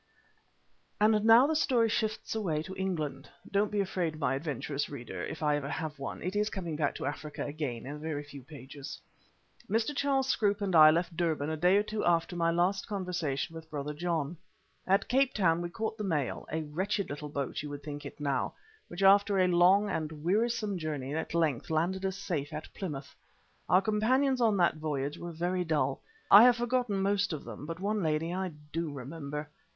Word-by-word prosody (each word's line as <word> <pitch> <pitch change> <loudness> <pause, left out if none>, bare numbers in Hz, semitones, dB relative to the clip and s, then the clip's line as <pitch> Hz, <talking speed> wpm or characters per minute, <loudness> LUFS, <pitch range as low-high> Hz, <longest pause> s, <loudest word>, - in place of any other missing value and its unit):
And 215 0 +4
now 230 +3 +8
the 315 +2 +1
story 250 -6 +3
shifts 220 0 -1
away 170 -9 -1
to 190 +3 -8
England. 175 -7 -3 0.2
(Don't 200 +1 +2
be 210 - 0
afraid, 180 -5 -2
my 140 -4 0
adventurous 140 0 -3
reader, 120 -10 -6
if - - -5
ever 145 -2 +1
I - - -5
have 155 -2 -4
one, 135 - -5
it 185 +3 -3
is 210 +1 +1
coming 175 -7 -4
back 150 -2 0
to - - -5
Africa 145 +1 -4
again 145 -6 -4
in 145 +3 -6
a - - -11
very 150 -1 -3
few 145 -1 -11
pages.) 135 0 -9 0.7
Mr. 225 +7 0
Charles 270 -2 +1
Scroope 205 -5 +1
and 190 -3 0
I 155 -1 +10
left 170 +2 +1
Durban 160 -3 0
a - - -1
day 180 +5 +4
or 205 - +3
two 215 0 -3
after 170 0 +2
my 165 -1 +2
last 180 +3 +1
conversation 180 -8 -2
with 160 -1 -9
Brother 150 -1 -4
John. 165 -1 -2 0.5
At 195 +1 +3
Cape 265 +1 +2
Town 170 -4 +3
we 175 - -3
caught 220 +4 -4
the - - -2
mail, 150 - -2
a 160 +1 -1
wretched 190 +6 -2
little 150 +1 -6
boat 140 -3 -3
you 150 - -6
would 145 0 -7
think 145 0 -6
it 140 - -9
now, 140 -2 -1 0.3
which 175 +3 -4
after 200 +1 +6
a 185 - +4
long 180 +4 +5
and 155 -4 -4
wearisome 210 +1 +1
journey 145 -4 -3
at 160 +1 -3
length 155 -7 +1
landed 175 +4 0
us 190 0 -4
safe 160 -7 -3
at 155 0 -7
Plymouth. 150 -8 -6 0.6
Our 185 +2 +5
companions 255 +6 +2
on 220 -3 +3
that 170 -3 +3
voyage 145 -2 -3
were 175 - -6
very 175 +2 -1
dull. 145 -5 0 0.3
I 200 - +11
have 250 -1 +6
forgotten 240 -5 0
most 200 0 +1
of 150 - -5
them, 120 +5 -8
but 165 +1 -5
one 205 +2 -1
lady 160 +1 0
I 190 +1 -1 0.3
do 165 -1 -2
remember. 145 +2 -6
170 Hz, 200 wpm, -30 LUFS, 150-200 Hz, 0.7 s, I